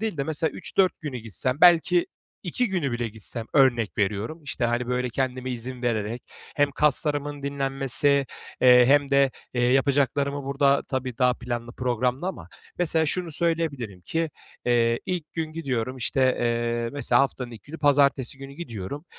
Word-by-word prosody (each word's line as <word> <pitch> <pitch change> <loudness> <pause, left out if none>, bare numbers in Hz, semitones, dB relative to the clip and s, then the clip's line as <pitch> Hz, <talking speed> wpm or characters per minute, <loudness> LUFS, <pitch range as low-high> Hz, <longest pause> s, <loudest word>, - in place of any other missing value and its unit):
değil 220 -6 -2
de, 140 - -1
mesela, 160 +1 0
3-4 190 -1 0
günü 145 -5 -5
gitsem, 120 +4 -1
belki 175 0 +5 0.4
2 225 +7 -1
günü 170 -10 -1
bile 120 -1 -2
gitsem, 110 +1 -4
örnek 120 -8 +3
veriyorum, 105 +10 -2
işte, 130 -3 -3
hani, 120 +1 0
böyle, 125 0 -1
kendime 130 0 -2
izin 125 +1 -4
vererek 115 0 -2 0.3
hem 145 -1 +3
kaslarımın 145 0 0
dinlenmesi, 140 0 +1 0.3
eee, 125 -1 +7
hem 140 +1 +4
de, 140 -1 +4 0.2
eee, 120 - 0
yapacaklarımı 140 +2 +1
burada 140 0 +2
tabii, 130 -2 -3
daha 125 -1 +3
planlı 120 -1 -5
programlı 125 +4 -1
ama, 190 - -6 0.3
mesela, 160 -2 +2
şunu 175 +1 -2
söyleyebilirim 145 - -2
ki, 165 - -2 0.4
eee, 115 -1 +2
ilk 175 -4 -4
gün 160 -1 -4
gidiyorum, 130 -6 -3
işte, 130 +1 +1
eee, 120 0 -1
mesela, 145 -1 +3
haftanın 130 -2 -1
ilk 110 -4 -11
günü, 160 +3 -9
pazartesi 140 -2 +2
günü 135 0 -9
gidiyorum. 140 - -7
135 Hz, 155 wpm, -25 LUFS, 120-145 Hz, 0.4 s, eee